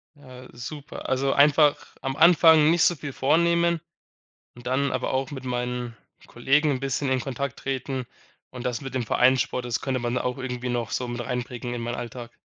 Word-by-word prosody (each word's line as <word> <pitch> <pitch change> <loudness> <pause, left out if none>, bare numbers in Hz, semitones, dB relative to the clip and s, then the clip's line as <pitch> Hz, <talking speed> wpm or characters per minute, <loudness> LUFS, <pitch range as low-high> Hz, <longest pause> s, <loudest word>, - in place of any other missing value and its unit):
Ja, 130 -3 -13
super. 140 +4 -8
Also, 135 +1 +1
einfach 145 +1 +5 0.3
am 135 -1 -3
Anfang 160 -2 +6
nicht 170 +1 +3
so 175 - +4
viel 145 -2 -7
vornehmen 170 +4 +2 0.8
und 120 0 -10
dann 140 +2 +1
aber - - -2
auch 135 +2 -1
mit 135 -2 -7
meinen 125 -2 -3 0.3
Kollegen 140 +5 +2
‘n 135 -3 0
bisschen 135 +1 -2
in 130 - +1
Kontakt 135 +1 -4
treten. 130 -1 -3 0.5
Und, 125 -1 -8
das 120 -1 -1
mit 135 -2 -7
dem 130 -2 -1
Vereinssport, 125 +1 +2
das 120 -1 -2
könnte 130 -2 -1
man 120 +1 -1
auch 125 +1 -2
irgendwie 125 -1 -4
noch 120 -3 -2
so 125 - -2
mit 120 0 -5
einbringen 125 0 -4
in 120 - -4
meinen 120 +1 -3
Alltag. 120 0 -7
130 Hz, 190 wpm, -25 LUFS, 125-140 Hz, 0.8 s, Anfang